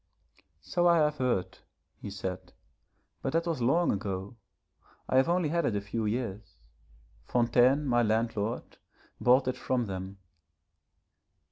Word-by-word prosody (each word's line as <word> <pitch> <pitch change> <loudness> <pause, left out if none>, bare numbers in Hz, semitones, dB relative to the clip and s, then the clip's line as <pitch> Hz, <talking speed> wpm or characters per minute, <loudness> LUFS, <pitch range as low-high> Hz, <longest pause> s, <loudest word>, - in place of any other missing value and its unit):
'So 175 0 +1
I 170 -1 +5
have 150 -1 +2
heard,' 95 -8 -1 0.4
he - - -6
said, 95 -2 -6 0.7
'but 135 - -2
that 165 +1 +1
was 165 -7 -2
long 165 +9 +3
ago. 100 +1 -4 0.7
I 130 - +2
have 135 +5 +4
only 175 -3 +1
had 170 +2 0
it 115 - 0
a 100 - -1
few 110 +2 -3
years. 110 -3 -4 0.7
Fontaine 125 +4 +3
my 120 -3 +3
landlord 110 0 -1 0.4
bought 130 +2 +4
it 130 - -1
from 125 -2 -1
them. 95 0 -6
120 Hz, 135 wpm, -29 LUFS, 100-140 Hz, 0.7 s, I